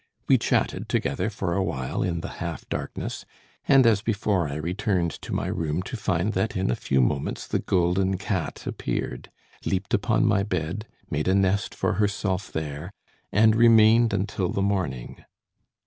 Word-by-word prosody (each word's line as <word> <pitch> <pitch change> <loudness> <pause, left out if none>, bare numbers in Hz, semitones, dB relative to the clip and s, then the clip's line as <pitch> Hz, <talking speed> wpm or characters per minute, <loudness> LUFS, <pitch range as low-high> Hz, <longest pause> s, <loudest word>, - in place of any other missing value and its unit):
We - - +5
chatted - - 0
together - - 0
for 85 - -2
a 95 - +1
while 65 -8 -2
in 85 -2 -1
the 95 - -5
half 85 -3 -5
darkness, - - -4 0.4
and, 135 -2 +6
as 110 -4 +4
before, 100 -6 0
I 70 - -4
returned 90 +2 -1
to - - -8
my - - -1
room 80 +2 -2
to 110 - -6
find 100 -1 0
that 110 - -1
in 95 -9 +1
a - - +1
few 65 - +1
moments 70 +3 -1
the - - -1
golden 95 +1 +1
cat 95 -2 -3
appeared, 60 - -4 0.3
leaped 95 0 -2
upon - - +2
my 100 - +3
bed, 100 +1 -3 0.2
made 75 +3 -1
a 95 - +3
nest 100 +1 +1
for - - 0
herself 100 -2 -1
there, 75 +2 -4 0.4
and 110 +1 +5
remained 115 0 +6
until 95 -2 -1
the 100 - -1
morning. 90 -12 -2
95 Hz, 165 wpm, -25 LUFS, 85-105 Hz, 0.4 s, and